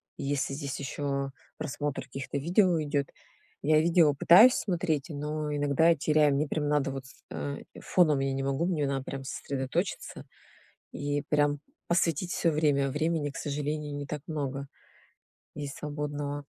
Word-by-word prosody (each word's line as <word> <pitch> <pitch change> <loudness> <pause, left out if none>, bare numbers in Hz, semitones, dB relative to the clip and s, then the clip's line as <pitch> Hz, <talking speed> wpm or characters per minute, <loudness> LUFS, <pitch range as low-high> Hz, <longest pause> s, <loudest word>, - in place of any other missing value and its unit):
если 140 0 -1
здесь 140 -1 -4
еще 140 -1 -2 0.3
просмотр 145 -2 -3
каких-то 135 +1 -5
видео 175 +3 +3
идет. 145 -1 -1 0.6
Я 155 +1 +5
видео 165 -2 +4
пытаюсь 185 - +8
смотреть, 165 -7 -1
но 150 0 -3
иногда 145 +3 +3
я 170 - +5
теряю, 150 -1 +3
мне 145 +2 +1
прям 150 -1 -1
надо 145 -2 +1
вот 135 -1 -6
с 135 - -17
э, 140 0 -4 0.2
фоном 155 -6 +3
я 135 0 0
не 135 0 -2
могу, 140 +4 0
мне 165 -5 0
надо 135 -1 -1
прям 135 -1 -5
сосредоточиться, 135 -1 -3 0.7
и 145 0 -2
прям 145 -1 +2 0.3
посвятить 170 0 +1
всё 165 - +1
время. 145 -3 +2
Времени 150 +1 0
к 160 - -11
сожалению 150 -1 -3
не 145 0 -5
так 150 -1 -5
много 140 -3 -3 0.9
есть 145 -2 -6
свободного. 145 -1 -4
145 Hz, 150 wpm, -29 LUFS, 140-155 Hz, 0.9 s, пытаюсь